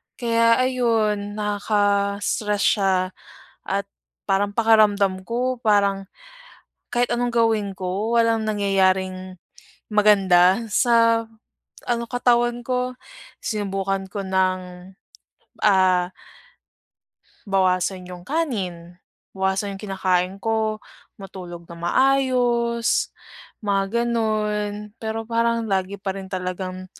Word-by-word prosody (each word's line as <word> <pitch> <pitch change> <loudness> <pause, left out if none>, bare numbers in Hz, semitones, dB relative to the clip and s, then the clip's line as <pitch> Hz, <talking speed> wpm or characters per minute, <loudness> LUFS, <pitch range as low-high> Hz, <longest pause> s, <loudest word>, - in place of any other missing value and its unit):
Kaya 230 -1 +3
ayun, 220 -5 0
nakaka-stress 205 0 0
siya, 195 -3 +3 0.7
at 200 +1 -1 0.4
parang 200 +1 0
pakiramdam 210 -4 +3
ko, 250 +1 -1
parang 200 -3 +2 0.9
kahit 245 0 +1
anong 240 0 0
gawin 225 -4 +1
ko, 195 +6 -2
walang 225 -1 +1
nangyayaring 190 -2 0 0.5
maganda 195 -1 +4
sa 230 -1 +3 0.6
ano 235 -1 0
katawan 240 -1 +2
ko. 250 0 -1 0.5
Sinubukan 195 -2 -2
ko 200 +1 -4
ng, 185 -1 -1 0.8
ah, 185 -3 +4 1.4
bawasan 185 -1 +1
yung 180 -1 -9
kanin, 190 - -3 0.4
bawasan 190 +1 -1
yung 195 - -13
kinakain 190 -2 0
ko, 220 0 -1 0.4
matulog 180 -3 -9
nang 170 0 -11
maayos, 245 -2 +2 0.6
mga 200 +3 0
ganun. 210 -2 -1
Pero 225 0 -3
parang 230 0 +1
lagi 195 0 -1
pa 195 0 -3
rin 195 -1 -7
talagang 185 0 -4
205 Hz, 95 wpm, -22 LUFS, 190-230 Hz, 1.4 s, maganda